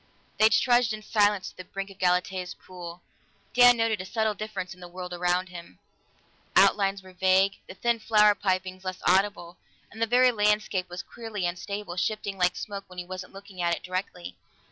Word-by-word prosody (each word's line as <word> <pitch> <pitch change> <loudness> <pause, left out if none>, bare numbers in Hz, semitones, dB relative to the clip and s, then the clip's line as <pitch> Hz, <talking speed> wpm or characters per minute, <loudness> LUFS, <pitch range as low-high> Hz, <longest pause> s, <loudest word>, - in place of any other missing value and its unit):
They 215 +1 +7
trudged 240 -1 +3
in 215 0 -7
silence 205 -3 +1
to - - -29
the 185 - -7
brink 195 +2 -6
of 195 - -16
Galatea's 180 0 0
pool. 175 -1 -10 0.5
Dan 245 -1 +7
noted 225 -3 +1
a - - -7
subtle 220 +1 0
difference 210 -3 -5
in 180 - -18
the 175 - -9
world 180 0 -7
about 180 +1 0
him; 170 - -11 0.8
outlines 195 0 +4
were 185 0 -14
vague, 190 +2 +3
the 185 - -10
thin 235 +2 0
flower 210 -1 +5
pipings 185 -1 -2
less 185 -1 -4
audible, 190 -2 +1 0.3
and 220 - -10
the 230 - +2
very 250 +2 +5
landscape 210 -4 +1
was 175 0 -6
queerly 225 -5 -5
unstable, 185 +1 -4
shifting 205 +1 -2
like 180 0 +2
smoke 200 -1 -6
when 180 -1 -14
he 180 - -5
wasn't 185 0 -7
looking 195 -2 -9
at 170 0 +2
it - - -12
directly. 180 - -5
190 Hz, 190 wpm, -27 LUFS, 180-210 Hz, 0.8 s, They